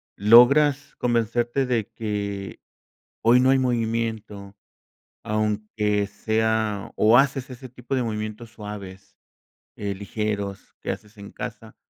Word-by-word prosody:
¿Logras 135 +7 +5
convencerte 120 +2 0
de 120 -4 -1
que 100 -3 -4 0.6
hoy 120 +2 +6
no 130 +1 +4
hay 135 - +4
movimiento, 110 -5 -2 0.7
aunque 105 -1 -1
sea 110 0 -1
o 110 +3 +5
haces 135 -1 +2
ese 130 +1 -10
tipo 125 +2 -5
de 130 - 0
movimientos 110 0 -5
suaves, 100 -3 -9 0.6
eh, 100 -1 -3
ligeros, 100 -1 -4
que - - -4
haces 105 +1 -7
en 100 0 -10
casa? - - -8
110 Hz, 115 wpm, -24 LUFS, 105-120 Hz, 0.7 s, hoy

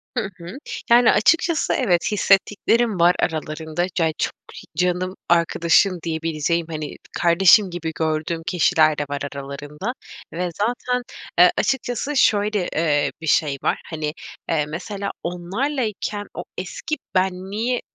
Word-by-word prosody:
Hı 225 -6 -1
hı, 175 +7 -9 0.3
yani, 240 0 +7
açıkçası 330 0 +2
evet, 185 -9 +1
hissettiklerim 210 +2 +2
var 175 +1 +5
aralarında. 160 +1 -2
Cay 160 -2 +1
çok - - -1 0.2
hi - - -10
"canım 180 0 0 0.2
arkadaşım" 170 +2 +3
diyebileceğim, 165 0 -1
hani, 155 -2 -5 0.2
kardeşim 185 +3 +5
gibi 170 -2 -4
gördüğüm 160 +1 -1
kişiler 155 -3 +3
de 145 - 0
var 145 0 -3
aralarında 145 - -6 0.4
ve 175 +2 -2
zaten, 245 +3 -1 0.4
eee, 180 0 +8
açıkçası 265 +2 -1
şöyle, 210 -5 +2
eee, 150 -2 +2
bir 160 - -6
şey 145 -2 +2
var: - - 0
Hani, 155 -2 -3 0.4
eee, 155 -3 +1
mesela 195 +6 -5
onlarlayken 205 +3 -3
o - - -5
eski - - -4 0.2
benliği 190 +6 0
180 Hz, 125 wpm, -22 LUFS, 160-210 Hz, 0.4 s, eee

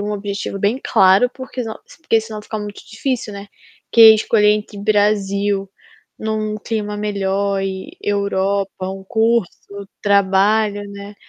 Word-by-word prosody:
um 210 +1 -3
objetivo 200 -1 -4
bem 210 +7 0
claro 190 +6 +4
porque, 260 -1 -6
senão, 220 -1 -5 0.3
porque 225 -8 +2
se 220 0 -11
não 215 - -5
fica 215 +1 -5
muito 210 -1 -7
difícil, 230 -1 -3
né, 200 0 -8 0.5
que 230 - +4
é 220 -1 +11
escolher 210 -1 +3
entre 210 -1 -4
Brasil, 200 -1 +1 0.5
num 215 -1 -2
clima 210 -1 -4
melhor 200 -1 -1
e 195 - -5
Europa, 200 -1 -1
um 190 0 -8
curso, 210 -2 -1
trabalho, 205 +1 +2
né. 200 +1 -9
205 Hz, 145 wpm, -19 LUFS, 200-220 Hz, 0.5 s, é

